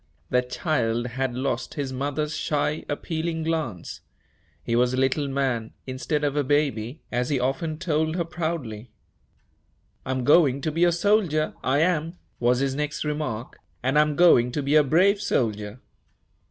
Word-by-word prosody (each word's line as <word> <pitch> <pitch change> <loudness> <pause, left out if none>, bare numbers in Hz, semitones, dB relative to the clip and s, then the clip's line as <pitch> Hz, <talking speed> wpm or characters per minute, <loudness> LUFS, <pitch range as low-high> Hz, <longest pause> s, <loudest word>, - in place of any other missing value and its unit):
The 125 - +4
child 120 -3 -1
had 130 0 -2
lost 130 -1 -2
his 140 -3 -3
mother's 145 +3 -2
shy, 150 +1 -1
appealing 160 +2 -2
glance. 155 - -3 0.6
He 115 - -1
was 125 +1 +2
a - - -4
little 135 +2 +1
man, 130 -5 -1
instead 135 +3 -2
of 145 -1 0
a 145 - +2
baby, 140 -2 0
as 125 +1 -1
he 140 -3 +1
often 135 +5 -1
told 160 -1 0
her 175 - 0
proudly. 155 -10 -4 1.1
"I'm 130 -1 -2
going 145 -1 +5
to 155 - -1
be 165 +3 +3
a 175 - +4
soldier, 170 -4 +1
I 135 +3 +2
am," 165 0 0 0.2
was 125 +2 +2
his 135 -1 0
next 150 +1 -2
remark, 150 -6 -4 0.2
"and 135 +4 +3
I'm 150 -1 +2
going 135 -8 +5
to 145 - -1
be 140 +2 0
a 155 -1 +7
brave 185 +8 +3
soldier." 105 - -1
145 Hz, 160 wpm, -25 LUFS, 125-155 Hz, 1.1 s, a